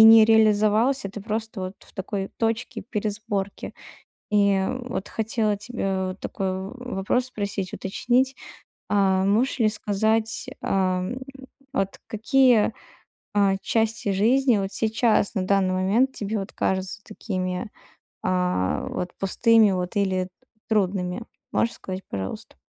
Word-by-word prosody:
не 225 Hz, 0 st, +10 dB
реализовался, 220 Hz, +2 st, +3 dB
ты 210 Hz, -, -7 dB
просто 220 Hz, 0 st, -3 dB
вот 185 Hz, +1 st, -4 dB
в -, -, -17 dB
такой 195 Hz, +1 st, -3 dB
точке 225 Hz, 0 st, -1 dB
пересборки. 205 Hz, -2 st, -3 dB, 0.6 s
И, 205 Hz, -1 st, +4 dB
м, 220 Hz, +7 st, -1 dB
вот 200 Hz, -5 st, -3 dB
хотела 220 Hz, -1 st, 0 dB
тебе 195 Hz, -4 st, -2 dB
вот 185 Hz, +1 st, -6 dB
такой 190 Hz, -1 st, -3 dB
в 190 Hz, +5 st, -5 dB, 0.2 s
вопрос 225 Hz, +6 st, +1 dB
спросить 200 Hz, -5 st, -3 dB
уточнить, 250 Hz, +7 st, +1 dB, 0.6 s
а, 190 Hz, -2 st, +3 dB
можешь 235 Hz, +7 st, +2 dB
ли 220 Hz, -, +4 dB
сказать, 220 Hz, +2 st, 0 dB
ам, 185 Hz, +4 st, 0 dB, 0.5 s
вот 195 Hz, 0 st, -1 dB
какие, 225 Hz, 0 st, +3 dB, 0.6 s
а, 200 Hz, -1 st, +3 dB
части 225 Hz, -2 st, 0 dB
жизни 240 Hz, +4 st, +3 dB
вот 195 Hz, -1 st, -2 dB
сейчас 220 Hz, -1 st, +2 dB
на 195 Hz, -, +1 dB
данный 190 Hz, -1 st, +2 dB
момент 210 Hz, +9 st, +2 dB
тебе 210 Hz, -1 st, -2 dB
вот 195 Hz, +1 st, -6 dB
кажутся 190 Hz, +2 st, -1 dB
такими, 185 Hz, -1 st, -4 dB, 0.5 s
а, 180 Hz, -, 0 dB
вот 180 Hz, -, -4 dB
пустыми 220 Hz, +2 st, +4 dB
вот 180 Hz, +1 st, -2 dB
или 190 Hz, -2 st, +1 dB
т -, -, -13 dB, 0.4 s
трудными? 195 Hz, -1 st, 0 dB, 0.3 s
Можешь 230 Hz, -, +1 dB
сказать 190 Hz, 0 st, -6 dB
пожалуйста? 95 Hz, -1 st, -5 dB
205 Hz, 130 wpm, -24 LUFS, 190-225 Hz, 0.6 s, не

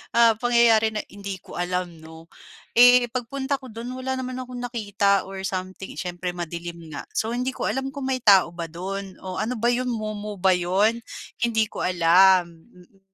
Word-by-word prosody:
ah, 235 Hz, -1 st, +7 dB
pangyayari 230 Hz, -2 st, +4 dB
na 210 Hz, -, -2 dB
hindi 200 Hz, -1 st, -6 dB
ko -, -, -9 dB
alam 175 Hz, -2 st, -2 dB
'no. 160 Hz, +1 st, -14 dB, 0.5 s
Eh, 245 Hz, -1 st, +7 dB
pagpunta 265 Hz, +3 st, -3 dB
ko 260 Hz, -, -11 dB
do'n 230 Hz, +2 st, -7 dB
wala 260 Hz, +1 st, -3 dB
naman 255 Hz, 0 st, -4 dB
akong 255 Hz, 0 st, -7 dB
nakita 205 Hz, -5 st, 0 dB
or 190 Hz, 0 st, -7 dB
something, 185 Hz, +1 st, -5 dB
siyempre 180 Hz, 0 st, -4 dB
madilim 170 Hz, 0 st, -6 dB, 0.2 s
nga. -, -, -5 dB
So, 225 Hz, +2 st, -1 dB
hindi 250 Hz, +2 st, -1 dB
ko -, -, -3 dB
alam 265 Hz, +1 st, -2 dB
kung 275 Hz, -1 st, -5 dB
may 260 Hz, -2 st, -2 dB
tao 190 Hz, -5 st, +5 dB
ba 170 Hz, -2 st, -6 dB
do'n 190 Hz, +2 st, -6 dB
o 185 Hz, -1 st, -7 dB
ano 230 Hz, +3 st, -2 dB
ba 235 Hz, -, +1 dB
'yon 245 Hz, +1 st, +1 dB
mumu 210 Hz, -2 st, -5 dB
ba 190 Hz, 0 st, +4 dB
'yon? 200 Hz, +6 st, +1 dB, 0.4 s
Hindi 225 Hz, -2 st, +2 dB
ko -, -, -6 dB
alam. 180 Hz, +1 st, +5 dB, 0.2 s
Mm. 180 Hz, +2 st, -21 dB
205 Hz, 185 wpm, -24 LUFS, 180-245 Hz, 0.5 s, ah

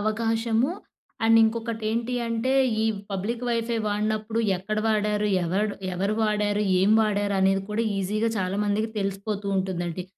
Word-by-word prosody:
అవకాశము, 225 Hz, +3 st, 0 dB, 0.5 s
అండ్ 225 Hz, 0 st, +6 dB
ఇంకొకటి 225 Hz, 0 st, -1 dB
ఏంటి 235 Hz, +2 st, -1 dB
అంటే, 230 Hz, +3 st, 0 dB, 0.3 s
ఈ -, -, +1 dB, 0.3 s
పబ్లిక్ 210 Hz, +5 st, -3 dB
వైఫై 230 Hz, -1 st, 0 dB
వాడినప్పుడు, 215 Hz, +2 st, -1 dB, 0.2 s
ఎక్కడ 215 Hz, +4 st, -3 dB
వాడారు 210 Hz, -1 st, +1 dB, 0.2 s
ఎవడు 200 Hz, +4 st, 0 dB, 0.2 s
ఎవరు 195 Hz, +4 st, 0 dB
వాడారు, 210 Hz, -1 st, +1 dB, 0.2 s
ఏం 200 Hz, +2 st, +3 dB
వాడారు 205 Hz, -2 st, +1 dB
అనేది 195 Hz, 0 st, +3 dB
కూడా 215 Hz, +2 st, 0 dB, 0.2 s
ఈజీగా 210 Hz, +4 st, 0 dB
చాలామందికి 205 Hz, +3 st, 0 dB
తెలిసిపోతూ 200 Hz, +1 st, -3 dB
ఉంటుందండి. 180 Hz, -2 st, -2 dB
210 Hz, 130 wpm, -25 LUFS, 200-225 Hz, 0.5 s, అండ్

